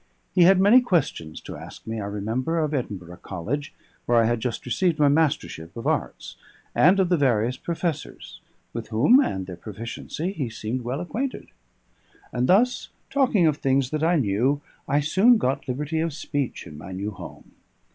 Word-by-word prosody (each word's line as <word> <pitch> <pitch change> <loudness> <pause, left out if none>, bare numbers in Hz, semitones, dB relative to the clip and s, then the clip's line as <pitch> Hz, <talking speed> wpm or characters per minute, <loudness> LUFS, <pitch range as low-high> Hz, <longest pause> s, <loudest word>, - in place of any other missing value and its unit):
He 180 -2 +6
had 190 +1 +6
many 210 +7 +7
questions 145 - -1
to - - -8
ask - - -11
me, 110 -1 -4
I 100 - -4
remember, 110 +10 -2
of 155 -2 0
Edinburgh 95 - -4
College, 115 - -4 0.4
where 120 - +3
I 115 - +6
had 120 +1 +1
just 115 0 -3
received 165 +7 +1
my 145 -1 +4
mastership 145 - 0
of 115 - -6
arts, - - -2 0.4
and 180 +5 +5
of 185 -2 +2
the 180 - +3
various 125 -4 +2
professors, 165 +1 -4 0.3
with 115 -1 -5
whom 130 - +5
and 95 - 0
their 90 -1 -7
proficiency 115 - -5
he 140 - -3
seemed 115 +3 -4
well 125 +6 -3
acquainted; 250 +9 -4 0.8
and 125 +1 0
thus, 245 +6 +3 0.2
talking 250 -10 +3
of 155 -2 +2
things 135 -2 +1
that 155 -1 -1
I 170 +2 +3
knew, 130 +2 +1 0.3
I 145 +1 +2
soon 195 +11 +5
got 135 -7 -1
liberty 150 +5 -2
of 165 -1 -1
speech 145 -2 -3
in 75 -3 -10
my 95 +4 -8
new 100 +3 -3
home. 100 - -11
140 Hz, 175 wpm, -24 LUFS, 110-170 Hz, 0.8 s, many